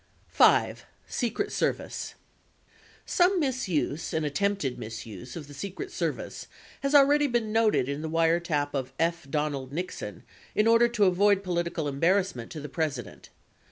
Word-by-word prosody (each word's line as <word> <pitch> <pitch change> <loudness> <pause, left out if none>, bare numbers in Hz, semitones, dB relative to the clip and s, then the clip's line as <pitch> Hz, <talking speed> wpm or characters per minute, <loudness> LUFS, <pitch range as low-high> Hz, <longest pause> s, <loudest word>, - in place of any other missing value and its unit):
5. - - +4 0.2
SECRET 340 - -2
SERVICE - - -2 0.9
Some 360 +1 +3
misuse 200 - -1
and 160 -1 0
attempted 170 -3 -1
misuse 110 +1 -8
of 155 -4 -7
the 145 - -11
Secret 200 - -6
Service - - -4 0.3
has 275 +1 +1
already 290 +1 +6
been 235 -4 0
noted 220 - +3
in 140 +1 -3
the 160 - -4
wiretap 165 -2 +1
of 130 -2 -3
F. 170 -3 -1
Donald 145 -3 -2
Nixon 180 +5 -5 0.3
in 215 - +3
order 230 +1 +6
to 235 -4 +2
avoid 200 +2 +3
po 180 -2 -3
litical 170 -2 -1
embarrassment 165 -3 +1
to 155 - -6
the 150 - -6
President. 145 - -4
170 Hz, 145 wpm, -27 LUFS, 145-220 Hz, 0.9 s, already